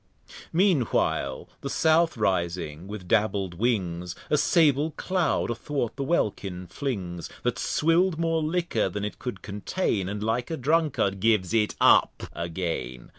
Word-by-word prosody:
Mean 180 -4 +3
while - - -1
the 140 - -4
South 160 0 +3
rising 85 -5 -1
with 100 -3 -7
dabbled 100 -3 +1
Wings, 90 -7 -1 0.2
A 150 - +4
Sable 150 -1 +3
Cloud 180 -9 0
a - - +1
thwart 130 -1 -3
the 140 - -3
Welkin 100 - -1
flings, 90 - -4
That - - -1
swill'd 165 +2 +2
more 165 -1 +1
Liquor 155 - 0
than 105 +2 -3
it 105 - -6
could 125 - -6
contain, 100 - -2
And 105 +1 -4
like 115 +3 -1
a 160 - -3
Drunkard 140 -8 +1
gives 105 -2 +2
it 110 -2 +2
up - - +4
again. 85 -7 -4
110 Hz, 145 wpm, -26 LUFS, 95-155 Hz, 0.2 s, A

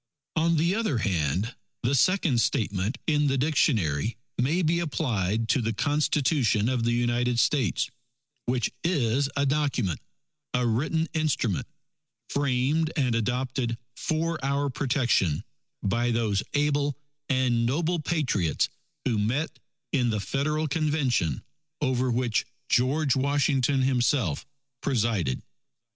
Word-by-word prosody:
On 165 0 +3
the 170 +4 +2
other 215 - 0
hand, 95 - 0 0.3
the 120 +3 +1
second 150 -4 +3
statement 105 +1 0
in 150 -2 +2
the 135 0 +1
dictionary, 115 - +1 0.2
may 155 +9 +2
be 170 +2 +2
applied 115 - -1
to 135 - +3
the 115 0 -1
Constitution 135 -2 +2
of 125 -3 0
the 120 - +2
United 120 0 +1
States, 125 -3 +2 0.6
which 120 -2 0
is 140 -5 +1
a 140 0 +2
Document, 135 - 0 0.6
a 125 0 +1
written 155 +8 +1
instrument, 150 - 0 0.6
framed 145 +3 +1
and 130 -6 +1
adopted 125 +1 -1 0.2
for 165 -1 -1
our 140 0 0
protection 125 - +1 0.4
by 120 +5 +1
those 110 -4 +1
able 145 -1 +1 0.3
and 125 -3 +2
noble 165 +6 0
Patriots 135 - 0 0.4
who 115 -5 +1
met 125 +10 -1 0.3
in 125 -4 +2
the 110 -2 0
Federal 150 +8 -1
Convention, 140 - 0 0.4
over 130 -3 +1
which 120 -2 +1 0.3
George 135 +3 +2
Washington 135 -1 +2
himself 125 - +1 0.3
presided. 110 - 0
130 Hz, 120 wpm, -27 LUFS, 115-150 Hz, 0.6 s, On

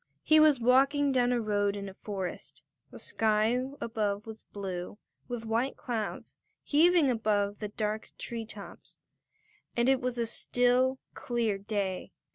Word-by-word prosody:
He 310 0 +6
was 305 -4 +6
walking 275 +4 +4
down 250 -2 +2
a 245 - +2
road 205 -2 0
in 200 -1 -5
a 195 - -8
forest. 190 -2 -6 0.3
The - - -11
sky 220 +3 +1 0.2
above 210 -3 -2
was 220 -1 -10
blue, 190 -1 -5 0.3
with 240 -2 -5
white 230 +4 0
clouds 230 -4 -4 0.3
heaving 320 -1 +4
above 205 -3 0
the 210 - -3
dark 215 +1 -3
tree 230 -2 -5
tops, 205 -2 -8 0.8
and 235 +1 +3
it 265 0 +3
was 250 -1 -2
a 235 - +1
still, 250 +3 +2 0.2
clear 230 -5 -1
day. 195 -2 -3
225 Hz, 145 wpm, -30 LUFS, 205-250 Hz, 0.8 s, He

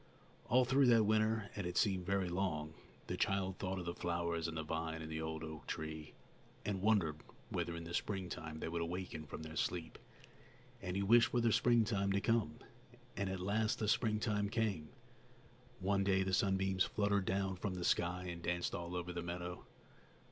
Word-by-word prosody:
All 125 +1 +5
through 135 +1 +4
that 115 -2 +6
winter 110 0 +2
and 100 -4 -2
it 90 - -3
seemed 95 -4 +2
very 100 -1 +1
long 85 -4 -1 0.3
the - - -3
child 95 -1 0
thought 95 0 -2
of 90 - -4
the 85 - -2
flowers 85 -1 -1
and 80 0 -4
the 80 - -2
vine 80 +1 -3
and 80 0 -6
the 80 0 -2
old 80 0 -3
oak 80 -1 -7
tree, 80 -1 -5 0.5
and 100 -2 -1
wondered 90 -8 +2 0.3
whether 85 - -2
in 85 - -5
the 85 +1 -7
springtime 85 -5 -3
they - - -3
would 85 +1 -2
awaken 85 -2 -4
from 80 - -6
their 80 0 -7
sleep; 85 -1 -2 0.8
and 90 -1 -3
he 100 - +1
wished 115 +3 +6
for 120 - +1
the 115 -1 +3
springtime 110 -5 +3
to 100 - +3
come. 110 -7 +1 0.6
And 100 0 -1
at 95 0 -3
last 105 +4 +1
the 110 - -1
springtime 105 -2 +1
came. 100 -9 -1 0.9
One 100 +1 +2
day 95 -1 +3
the 95 0 -2
sunbeams 95 0 +3
fluttered 100 -2 +1
down 95 0 0
from 95 0 -2
the 90 -1 -3
sky 90 +1 +1
and 85 -1 -5
danced 90 +1 -1
all 85 +1 -4
over 90 0 -3
the 85 - -3
meadow. 90 +1 -5
95 Hz, 190 wpm, -37 LUFS, 85-100 Hz, 0.9 s, that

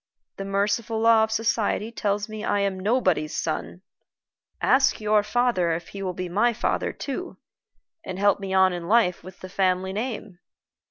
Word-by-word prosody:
The 195 - -5
merciful 205 +3 0
law 225 0 +5
of 220 - -11
society 220 0 0
tells 205 -2 -1
me 215 -1 -7
I 205 - +1
am 195 -1 -1
nobody's 185 -7 +1
son! 165 +3 -3 0.8
Ask 265 +1 +3
your 210 -1 +3
father 210 -6 +1
if 165 +1 -5
he 200 - -8
will 185 -2 -3
be 185 0 -4
my 215 +7 +2
father 235 - -1
too, 290 +6 -6 0.7
and 185 - -6
help 200 0 +3
me 195 -1 -5
on 190 -1 +4
in 175 -1 -5
life 210 -4 +2
with 185 0 -12
the 185 - -7
family 185 0 0
name." 215 -4 -5
200 Hz, 170 wpm, -25 LUFS, 185-225 Hz, 0.8 s, law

